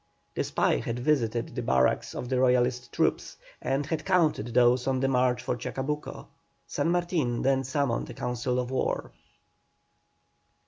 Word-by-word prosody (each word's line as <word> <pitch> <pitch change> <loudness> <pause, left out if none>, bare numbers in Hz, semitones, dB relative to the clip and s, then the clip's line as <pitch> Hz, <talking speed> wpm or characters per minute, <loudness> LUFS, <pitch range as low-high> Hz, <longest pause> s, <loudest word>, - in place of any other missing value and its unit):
The - - -1
spy - - +1
had 115 - -3
visited 120 -4 0
the - - -3
barracks 65 -1 +1
of 125 - -4
the 130 0 0
Royalist 125 -1 +2
troops, - - 0 0.2
and 135 +2 -1
had 155 +1 -3
counted 170 - +2
those 125 +1 +4
on 130 -1 +1
the 135 - +1
march 125 -2 +1
for 120 - -1
Chacabuco. 135 +5 -4 0.4
San - - -1
Martin 170 -8 0
then 135 0 +2
summoned 130 -2 -1
a - - -8
council 125 +1 -2
of 125 0 -2
war. 130 - -1
130 Hz, 150 wpm, -28 LUFS, 120-140 Hz, 0.4 s, those